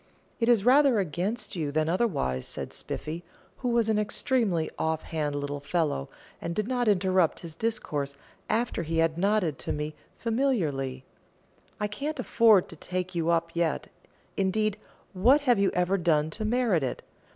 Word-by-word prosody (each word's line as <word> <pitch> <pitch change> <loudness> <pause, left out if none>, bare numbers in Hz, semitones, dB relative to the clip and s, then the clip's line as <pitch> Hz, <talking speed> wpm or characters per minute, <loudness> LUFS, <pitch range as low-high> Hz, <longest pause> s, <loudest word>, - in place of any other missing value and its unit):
"It 230 0 +2
is 225 -4 +4
rather 270 -1 +6
against 195 +6 -2
you 155 -5 -2
than 155 +1 +1
otherwise," 160 - 0
said - - -6
Spiffy, 165 +3 -5 0.3
who 250 - -2
was 235 -2 +2
an 215 -1 +2
extremely 210 - +1
off 160 0 0
hand 150 -3 -2
little 145 0 -3
fellow, 145 - -1 0.3
and 170 0 -3
did 215 +2 -1
not 245 -2 0
interrupt 185 -4 +2
his 165 -2 -7
discourse 150 -8 -2 0.3
after 230 -4 0
he 165 0 -2
had 165 0 +2
nodded 195 -6 +1
to - - -3
me 150 +1 -3 0.2
familiarly; 160 - -1 0.7
"I 210 - 0
can't 280 +8 -4
afford 225 -6 +5
to - - -9
take 185 +3 -4
you 170 -1 0
up 170 0 +1
yet; 170 -2 0 0.5
indeed, 210 +2 0 0.3
what 245 +10 +5
have 245 -6 +3
you 200 - +4
ever 180 +2 +2
done 160 -2 +2
to 215 +6 -4
merit 225 -6 +2
it? 130 - -3
185 Hz, 160 wpm, -28 LUFS, 160-225 Hz, 0.7 s, rather